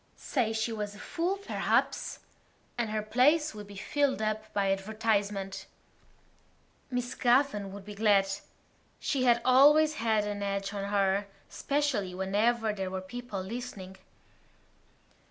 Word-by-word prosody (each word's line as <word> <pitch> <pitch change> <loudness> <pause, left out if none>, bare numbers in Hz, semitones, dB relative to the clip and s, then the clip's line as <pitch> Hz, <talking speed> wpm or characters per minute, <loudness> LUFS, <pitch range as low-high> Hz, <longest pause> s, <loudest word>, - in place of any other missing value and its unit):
Say 240 -6 -1
she 220 +1 -1
was 210 -2 -4
a - - -12
fool, 350 - -2
perhaps; 400 - 0 0.6
and 235 -2 -1
her 215 0 -2
place 285 +8 +3
would 210 -1 -9
be 200 - -11
filled 275 +7 0
up 215 0 -2
by 195 -1 +1
advertisement. 200 -1 -1 1.2
Miss 245 -1 -2
Gavan 240 -6 +2
would 200 0 -9
be 210 - -8
glad. 205 -2 +3 0.7
She 265 -3 0
had 240 -1 +4
always 300 +4 +6
had 220 -2 +2
an 205 -1 -4
edge 200 0 -2
on 200 -1 -3
her, 200 0 +1 0.2
especially 270 -11 -1
whenever 215 +4 +1
there 190 -2 -3
were 190 0 -3
people 215 +1 -6
listening. 195 -3 -7
215 Hz, 135 wpm, -30 LUFS, 200-245 Hz, 1.2 s, always